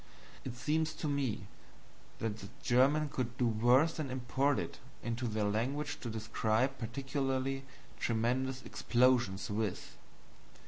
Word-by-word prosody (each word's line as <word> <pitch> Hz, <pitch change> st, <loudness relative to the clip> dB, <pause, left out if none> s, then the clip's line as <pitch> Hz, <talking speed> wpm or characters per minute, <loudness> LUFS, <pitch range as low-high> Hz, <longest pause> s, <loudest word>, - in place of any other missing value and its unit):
It 125 Hz, -2 st, -5 dB
seems 155 Hz, +5 st, 0 dB
to 155 Hz, -, -3 dB
me 140 Hz, -8 st, 0 dB, 0.8 s
that 110 Hz, -2 st, -2 dB
the 100 Hz, -, -8 dB
Germans 140 Hz, +4 st, +3 dB
could 125 Hz, -2 st, -2 dB
do 125 Hz, -, +2 dB
worse 120 Hz, +8 st, +4 dB
than 155 Hz, -4 st, -3 dB
import 130 Hz, +2 st, +1 dB
it -, -, -4 dB, 0.2 s
into 120 Hz, +1 st, -2 dB
their 110 Hz, -1 st, 0 dB
language 130 Hz, +8 st, -1 dB
to 120 Hz, -, -5 dB
describe 110 Hz, +3 st, 0 dB
particularly 135 Hz, +2 st, -1 dB, 0.3 s
tremendous 125 Hz, +3 st, 0 dB
explosions 120 Hz, -6 st, +2 dB
with. 105 Hz, -2 st, -2 dB
125 Hz, 125 wpm, -34 LUFS, 115-135 Hz, 0.8 s, worse